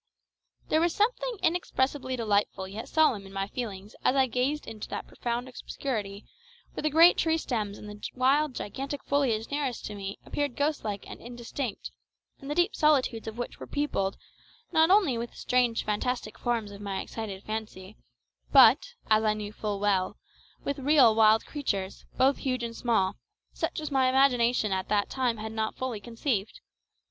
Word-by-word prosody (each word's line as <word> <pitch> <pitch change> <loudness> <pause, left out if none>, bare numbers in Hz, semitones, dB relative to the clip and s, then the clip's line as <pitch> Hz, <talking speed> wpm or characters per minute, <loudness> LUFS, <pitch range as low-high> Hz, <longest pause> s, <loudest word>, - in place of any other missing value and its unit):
There 315 - +3
was 340 -1 +1
something 485 +2 0
inexpressibly 275 -6 0
delightful 205 -4 0
yet 205 +4 -7
solemn 245 -11 +2
in - - -13
my 195 0 -2
feelings 205 -3 -6
as 255 - +3
I 265 -1 +5
gazed 260 +5 -1
into 215 -1 -7
that - - -4
profound 240 +1 -3
obscurity 215 -5 -5 0.5
where - - -4
the 305 - +1
great 330 +4 +7
tree 320 0 +2
stems 215 -9 -3
and 210 - -10
the 210 0 -10
wild 270 +2 +2
gigantic 275 +6 -5
foliage 255 -6 0
nearest 280 -4 -2
to 210 - -5
me 195 -1 -6
appeared 285 -4 -2
ghost 290 +1 0
like 205 -2 -4
and - - -10
indistinct, 240 0 -5 0.5
and 275 - -9
the 295 - -1
deep 350 +5 +2
solitudes 270 -7 +2
of 220 +1 -6
which 240 - -5
were - - -8
peopled, 195 -10 -1 0.5
not 320 +1 +4
only 370 - +4
with 235 0 -4
the - - -23
strange 245 -2 +1
fantastic 215 +1 -2
forms 230 -4 -1
of 200 0 -10
my 200 -2 -3
excited 205 -4 -6
fancy, 215 -2 -6 0.6
but, - - +6
as 215 0 +4
I 215 -1 +2
knew 210 0 -6
full 210 -2 -3
well, 195 -2 +1 0.5
with 280 0 -2
real 270 -4 +6
wild 220 0 +5
creatures, 200 -10 -3
both 270 +2 +4
huge 255 -2 -2
and 230 0 -4
small, 225 -7 +1 0.4
such - - -2
as 305 -1 -5
my 265 -2 +3
imagination 250 -4 +3
at 190 0 -2
that 205 -1 +1
time 250 -3 0
had 220 +1 -5
not 220 0 -2
fully 255 -4 -3
conceived. 230 - -3
240 Hz, 175 wpm, -28 LUFS, 210-280 Hz, 0.6 s, great